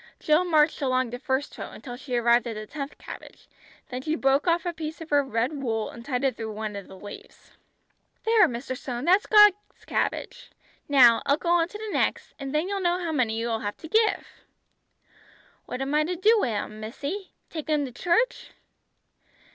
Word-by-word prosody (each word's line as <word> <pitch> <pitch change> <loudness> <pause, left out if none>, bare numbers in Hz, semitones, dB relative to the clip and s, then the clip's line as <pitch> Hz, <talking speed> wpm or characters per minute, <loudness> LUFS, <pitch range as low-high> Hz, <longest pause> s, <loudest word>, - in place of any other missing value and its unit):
Jill 305 +3 +3
marched 315 -3 +3
along 255 -3 +1
the 245 - -5
first 265 +2 -2
row - - -5
until 245 -3 -9
she 255 0 -5
arrived 240 0 +3
at 230 - -4
the 215 0 -6
tenth 280 +3 -7
cabbage, - - -11 0.4
then 250 0 -4
she 310 +3 -1
broke 275 +1 +2
off 345 +1 +2
a 350 - -1
piece 315 -1 -6
of 325 -1 -10
her 290 -1 +4
red 265 +3 -2
wool 225 -4 -2
and 235 - -11
tied 250 -1 -2
it 265 -4 +1
through 220 -2 -5
one 215 -1 -5
of 200 -1 -7
the 190 - -12
leaves. 205 +2 -12 0.7
"There, 445 -4 +5
Mr. 255 0 -5
Stone, 250 0 -5
that's 375 +4 +4
God's 420 -1 +5
cabbage. - - -2 0.4
Now, 245 -5 +7
I'll 280 - +4
go 340 - -3
on 345 -1 +4
to 420 - -9
the 430 -1 -6
next, - - 0
and 275 -1 -5
then 305 +4 0
you'll 400 0 -2
know 350 -1 +2
how 345 -3 -3
many 240 -7 0
you 230 +1 -2
will 225 -1 -1
have 205 -1 -4
to 320 - -10
give." 435 +3 +2 1.4
"What 250 - -5
am 275 +2 -3
I 305 +1 +4
to 355 +4 -2
do 420 +6 +4
wi' 255 - +1
'em, 215 0 -4
missy. 285 - -6 0.2
Take 315 -1 -6
'em 300 -2 +2
to 255 - -7
church?" 355 - 0
280 Hz, 205 wpm, -26 LUFS, 240-340 Hz, 1.4 s, Now